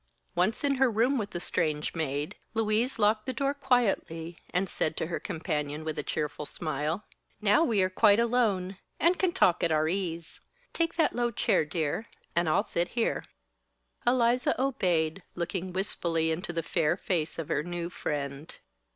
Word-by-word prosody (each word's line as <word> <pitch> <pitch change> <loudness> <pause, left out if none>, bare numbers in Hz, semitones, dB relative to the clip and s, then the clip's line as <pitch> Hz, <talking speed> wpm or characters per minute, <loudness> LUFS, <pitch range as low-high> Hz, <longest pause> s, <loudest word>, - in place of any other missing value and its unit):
Once 185 +9 +1
in 280 -1 +2
her 265 - +6
room 240 +5 +2
with 205 -2 -3
the 175 - -4
strange 155 -3 -1
maid, 145 -2 -2 0.2
Louise 225 +3 +1
locked 215 +2 +2
the 260 - -1
door 275 +1 0
quietly 205 - 0
and 185 +2 0
said 155 -3 -1
to - - 0
her 170 - -3
companion 150 -4 -3
with 155 -1 -3
a - - +1
cheerful 150 0 -3
smile: 155 +5 -3 0.3
"Now 210 +9 +4
we 220 - +3
are 185 - +1
quite 205 +2 +5
alone, 215 -6 +1 0.2
and 350 +2 +3
can 370 -2 +3
talk 185 - +3
at 170 - +3
our 155 0 +3
ease. 170 -2 -3 0.3
Take 335 -1 0
that 330 -2 +2
low 240 0 +1
chair, 205 -7 +2
dear, 160 +7 -2 0.3
and 170 -1 +2
I'll - - +3
sit 170 +1 -1
here." 230 - +1 0.8
Eliza 245 0 +3
obeyed, 185 -10 +1
looking 180 +1 -3
wistfully 170 -4 0
into 175 +3 -3
the 165 -1 -2
fair 160 +2 +1
face 165 -5 -1
of 165 -3 -4
her 150 - +1
new 175 +1 -4
friend. 140 -2 -4
180 Hz, 170 wpm, -29 LUFS, 160-230 Hz, 0.8 s, her